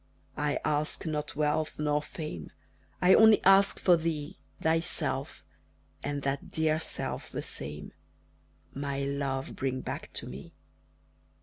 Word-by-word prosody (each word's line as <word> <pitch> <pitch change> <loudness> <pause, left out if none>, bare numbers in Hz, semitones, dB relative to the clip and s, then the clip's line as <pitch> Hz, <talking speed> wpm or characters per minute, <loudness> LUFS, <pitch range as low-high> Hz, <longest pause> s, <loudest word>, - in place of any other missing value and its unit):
I 145 -1 +1
ask 150 0 -1
not 150 -2 -3
wealth 150 +1 0
nor 150 0 +1
fame, 150 - -7 0.5
I 180 +1 +7
only 220 -1 +8
ask 195 +1 +6
for 180 - +5
thee, 160 -3 -3 0.2
Thyself 165 +2 0 0.6
and 145 -1 -3
that 135 0 -2
dear 160 0 +1
self 160 - -3
the - - -4
same 75 +2 -5 0.8
My 140 0 -3
love, 140 -1 -2
bring 130 -1 -2
back - - -6
to - - -5
me! 65 +2 -9
150 Hz, 125 wpm, -30 LUFS, 140-160 Hz, 0.8 s, only